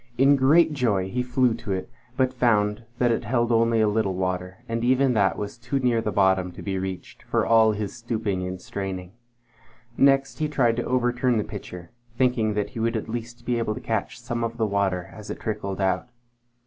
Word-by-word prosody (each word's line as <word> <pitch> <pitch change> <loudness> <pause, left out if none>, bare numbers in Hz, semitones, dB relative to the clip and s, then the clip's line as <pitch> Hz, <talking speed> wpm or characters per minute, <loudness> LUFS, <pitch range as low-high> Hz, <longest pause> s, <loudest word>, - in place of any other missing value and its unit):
In 135 +2 +6
great 155 +4 +4
joy 105 -9 0
he 125 +5 -1
flew 125 -1 +2
to 115 -2 -6
it, 95 - -3 0.3
but 130 -1 +2
found 110 -3 +1
that 120 -1 +3
it 115 - 0
held 120 +1 +1
only 115 0 +3
a 110 - +4
little 105 -3 0
water, 90 +3 -3
and 115 0 -2
even 130 +1 +3
that 95 -6 +2
was 105 +3 -5
too 125 +3 -2
near 125 -3 +2
the 110 - -2
bottom 95 -2 +2
to - - -10
be 95 -2 -2
reached, 95 -1 -6
for - - 0
all 110 -1 +5
his 105 0 -4
stooping 115 -5 -2
and 90 0 -5
straining. 95 -2 -5 0.9
Next 135 +1 +3
he 155 - +1
tried 120 -6 +1
to 120 - -1
overturn 125 -1 +1
the 105 - +1
pitcher, 90 -4 -9 0.3
thinking 125 -5 +2
that 105 -1 -1
he 120 - -7
would 115 +1 0
at 110 - -6
least 120 +1 -6
be 120 -1 0
able 110 -2 -1
to - - -6
catch 115 +1 -3
some 120 -1 -3
of 115 0 -3
the 115 - +1
water 100 -3 0
as 105 -1 -10
it - - -5
trickled 100 -3 -4
out. 95 +4 0
115 Hz, 210 wpm, -25 LUFS, 100-125 Hz, 0.9 s, In